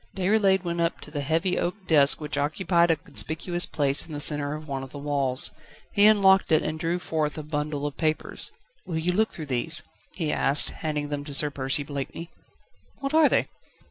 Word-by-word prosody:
Déroulède 190 0 +2
went 170 -1 -2
up 170 0 -1
to 150 - -8
the 145 -1 -3
heavy 165 +6 0
oak 175 - -1
desk 145 -5 +5
which 150 -1 -5
occupied 170 +4 +1
a 165 - +4
conspicuous 165 +3 -1
place 140 -1 +1
in 160 - -10
the 145 - -4
centre 145 0 +2
of 155 0 -9
one 135 -2 -4
of 135 - -8
the 145 - -10
walls. 140 -3 0 0.4
He 205 0 +6
unlocked 195 -4 +4
it 155 - +4
and 155 0 -3
drew 170 +2 -1
forth 160 -3 -2
a 155 - -5
bundle 150 -1 -3
of 145 - -4
papers. 155 -1 -2 0.3
"Will 170 -3 -4
you 165 +3 0
look 220 +5 +1
through 160 - -7
these?" 140 +4 +1 0.3
he 160 -4 -2
asked, 140 +2 +2
handing 150 -2 -4
them 145 -1 -3
to 145 -2 -1
Sir 150 +1 +2
Percy 135 +1 -2
Blakeney. 145 +4 -6 0.7
"What 275 +1 -4
are 315 -1 +5
they?" - - +1
155 Hz, 205 wpm, -25 LUFS, 145-175 Hz, 0.7 s, He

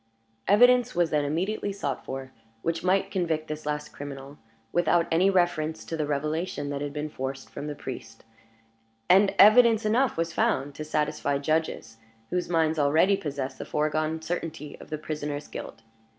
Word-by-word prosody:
Evidence 245 +3 +5
was 175 -2 +2
then 150 -2 +2
immediately 185 +8 -1
sought 195 -8 -4
for, 130 0 -6 0.3
which 165 0 -1
might 195 +2 +2
convict 165 -4 -1
this 155 0 -6
last 150 0 -2
criminal 140 0 -9 0.3
without 175 0 +3
any 175 +4 +4
reference 165 -4 0
to 165 - -4
the 155 -2 -2
revelation 150 +1 -2
that 140 0 -3
had 145 -1 -3
been 150 +1 -3
forced 135 -2 -6
from 145 +1 -6
the 150 - -4
priest 120 -5 -8 0.9
and 195 +2 +5
evidence 225 +1 +7
enough 235 +2 +2
was 165 0 -1
found 155 - 0
to 155 - -6
satisfy 150 -2 -1
judges 155 -6 -2 0.3
whose 180 -1 -1
minds 160 -2 +2
already 155 +7 +4
possessed 140 -6 -5
the - - -4
foregone 155 +1 -1
certainty 160 -3 -4
of - - -12
the 155 - -3
prisoner's 150 -1 -5
guilt. 110 - -8
155 Hz, 165 wpm, -27 LUFS, 145-180 Hz, 0.9 s, evidence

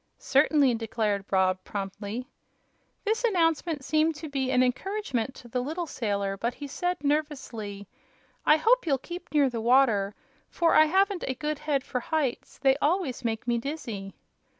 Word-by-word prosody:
"Certainly," 280 -1 +3
declared 215 -3 -1
Rob, 185 -1 +2
promptly. 205 +4 -5 0.8
This 445 +3 0
announcement 330 - +1
seemed 310 +1 +2
to 310 +1 -7
be 270 -2 -1
an 255 -1 +4
encouragement 265 - -2
to 245 - -12
the 250 +1 -2
little 320 +7 -3
sailor, 200 -8 -2
but 235 +4 -2
he 290 - -7
said, 355 +3 -2
nervously: 260 -9 -2 0.6
"I 305 - +6
hope 460 +4 +3
you'll 275 -3 +3
keep 350 +7 -9
near 290 -2 +4
the 235 -3 -3
water, 225 -5 +3 0.3
for 335 -1 +2
I 310 - +7
haven't 385 +3 +2
a 260 - -1
good 300 +2 -3
head 290 -3 0
for 255 - -3
heights 280 -1 -2
they 270 0 +4
always 295 -4 0
make 225 0 -2
me 235 -1 +2
dizzy." 230 -8 -5
270 Hz, 160 wpm, -27 LUFS, 230-310 Hz, 0.8 s, I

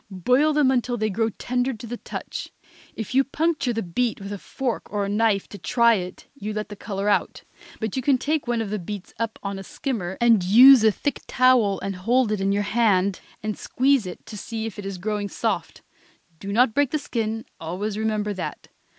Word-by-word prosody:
Boil 250 - +2
them 295 -3 +3
until 245 -1 0
they 215 -1 0
grow 225 +3 +1
tender 250 +4 -1
to 225 +1 -9
the 240 +1 -5
touch. - - -6 0.4
If 220 +2 -5
you 270 +1 +5
puncture 295 -1 0
the 225 -1 -2
beet 225 +7 -1
with 200 +1 -6
a 200 - -6
fork 255 +2 -4
or 205 -1 -1
knife, 205 -1 +1
to 205 - -9
try 235 +5 +4
it, 180 -3 -4
you 215 -6 -5
let 210 -1 -4
the 205 - -7
color 200 -1 -4
out, 205 - 0 0.4
but 220 -3 -3
you 260 - 0
can 265 +1 +3
take 300 +1 -1
one 240 -1 0
of 205 - -6
the 210 - -1
beets 195 +2 -7
up 230 -1 -2
on 200 -1 -4
a - - -7
skimmer 190 -5 -4
and 230 -5 +4
use 240 +6 +8
a 220 - +6
thick 280 +6 -3
towel 245 -6 +4
and 195 -1 -4
hold 235 +4 +2
it 210 -2 -1
in 195 0 +1
your 205 +1 +1
hand 200 -3 +2 0.2
and 215 -1 -2
squeeze 265 -5 +2
it 180 - -9
to - - -9
see 220 +3 -5
if 220 -2 -6
it 200 - -5
is 195 -2 -5
growing 205 +2 -2
soft. - - -3 0.6
Do 200 - -5
not 230 +2 +3
break 285 0 +2
the 305 - 0
skin, 225 -5 -3
always 190 +6 -3
remember 215 -1 -1
that. 190 - -6
220 Hz, 215 wpm, -24 LUFS, 200-245 Hz, 0.6 s, use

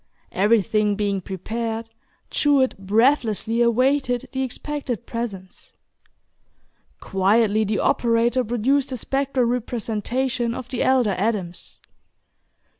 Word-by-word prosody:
Everything 210 0 +2
being 200 -2 -1
prepared, 225 +5 -4 0.4
Jewett 280 -3 +2
breathlessly 225 +2 +2
awaited 250 +1 +2
the 265 - -2
expected 265 -2 -4
presence. 205 -6 -7 1.3
Quietly 210 +3 +2
the 210 +1 -1
operator 235 +2 +2
produced 250 +5 +1
the 255 - -4
spectral 270 0 0
representation 240 +1 -2
of 255 -1 -7
the 255 - -3
elder 250 -6 +3
Adams. 195 -4 -3
230 Hz, 95 wpm, -23 LUFS, 210-255 Hz, 1.3 s, elder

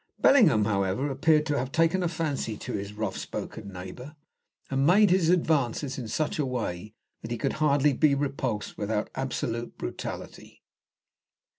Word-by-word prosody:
Bellingham, 155 - +5
however, 100 +6 0
appeared 150 +3 +3
to 145 -2 0
have 130 +1 -3
taken 165 +4 +2
a 175 - +1
fancy 150 -9 -2
to - - -6
his 100 +1 -4
rough 105 -2 -3
spoken 100 -3 -6
neighbour, 95 - -9 0.6
and 135 0 +1
made 190 +5 +5
his 180 -3 +3
advances 145 -6 +1
in 120 - -5
such 150 +8 -2
a - - +2
way 110 -5 -4 0.3
that 115 - -7
he 120 - -2
could 135 +4 -1
hardly 145 -1 +4
be 140 +2 +3
repulsed 135 -6 -3
without 105 +1 -2
absolute 120 -3 -3
brutality. - - -7
135 Hz, 155 wpm, -27 LUFS, 110-155 Hz, 0.6 s, Bellingham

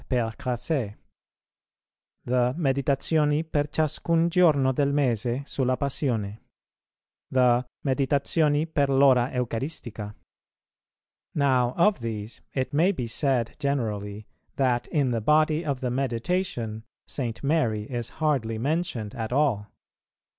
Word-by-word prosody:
Crasset; 120 0 -1 1.3
the 125 +1 +1
"Meditazioni 145 +1 +1
per 150 -2 0
ciascun 165 +2 +1
giorno 150 -7 +4
del 140 +2 +1
mese 125 -2 0
sulla 130 -3 0
Passione;" 115 -7 -1 0.9
the 125 -1 +3 0.2
"Meditazioni 145 +3 +2
per 145 -4 0
l'ora 135 -2 +4
Eucaristica." 115 -4 -4 1.2
Now 130 -4 +2
of 200 +1 +4
these 110 -1 -5
it 130 0 -2
may 170 +7 +4
be 130 -11 -3
said 120 0 0
generally, 110 -7 -2 0.3
that 125 -3 +1
in 140 -5 +1
the 115 -2 -1
body 155 +5 +3
of 140 -4 -2
the 125 -2 -1
Meditation 125 - -2 0.2
St. 120 -3 -4
Mary 135 -8 +1
is 120 0 -4
hardly 135 -8 0
mentioned 130 -5 -2
at 110 0 -4
all. 125 -7 +1
130 Hz, 110 wpm, -26 LUFS, 115-150 Hz, 1.3 s, giorno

